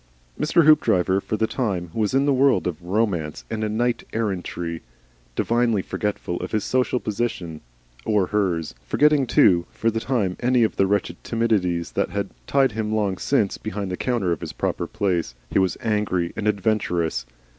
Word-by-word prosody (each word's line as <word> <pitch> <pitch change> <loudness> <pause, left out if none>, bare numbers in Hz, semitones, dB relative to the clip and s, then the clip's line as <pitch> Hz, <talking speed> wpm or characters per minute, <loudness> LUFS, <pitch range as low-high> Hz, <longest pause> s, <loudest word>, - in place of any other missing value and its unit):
Mr. 165 +1 +3
Hoopdriver 95 - +4
for 110 - -3
the 110 - +2
time, 95 -9 -2
was 110 +2 0
in 135 +1 +3
the 145 - +3
world 135 +1 +3
of 85 -2 -3
Romance 90 -5 -1
and 110 -1 -2 0.2
Knight 120 0 0
errantry, 90 -6 -3 0.5
divinely 115 -4 +1
forgetful 100 -4 -3
of - - -6
his 105 -2 +1
social 125 0 +1
position 100 -9 -3 0.4
or 105 -3 +2
hers; 90 -5 -1
forgetting, 145 - +3
too, 85 -6 +4
for 115 - 0
the 115 - -1
time 115 -7 -1
any 125 -1 +3
of 110 - 0
the 95 - +3
wretched 100 +1 -1
timidities 100 -7 0
that - - 0
had - - -3 0.2
tied 135 -2 +3
him 110 0 -3
long 105 -4 0
since 110 -8 +1
behind 105 -3 -4
the - - -1
counter 105 -6 0
in 80 - -5
his - - -6
proper - - -2
place. 85 -10 -1 0.2
He - - +3
was 95 -3 +1
angry 105 -6 0
and 105 - -2
adventurous. 90 - 0
105 Hz, 170 wpm, -23 LUFS, 90-115 Hz, 0.5 s, Hoopdriver